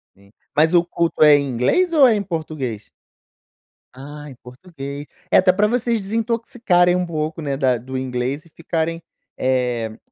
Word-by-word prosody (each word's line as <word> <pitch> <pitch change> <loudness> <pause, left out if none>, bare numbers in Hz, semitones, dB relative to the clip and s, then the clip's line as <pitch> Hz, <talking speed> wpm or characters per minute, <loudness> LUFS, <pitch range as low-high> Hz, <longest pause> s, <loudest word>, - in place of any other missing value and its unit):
Sim, 100 +1 -23 0.2
mas 160 +3 +3
o 175 0 +5
culto 170 -2 0
é 150 -1 +8
em 140 -1 -2
inglês 135 - +1
ou 290 -4 +6
é 230 - +4
em 205 - -1
português? 155 - -5 1.1
Ah, 145 +3 -10
em 130 - -11
português, 140 +2 -9 0.2
é - - +5
até 185 0 +5
pra 210 +3 +2
vocês 235 -1 0
desintoxicarem 220 -4 +1
um 180 0 0
pouco, 155 0 -4
né, 140 -2 -3
da 130 -3 +2
do 130 +3 -6
inglês 130 +4 -3
e - - -20
ficarem, 165 +1 -3 0.3
eh, 125 -4 -1
155 Hz, 165 wpm, -20 LUFS, 130-180 Hz, 1.1 s, é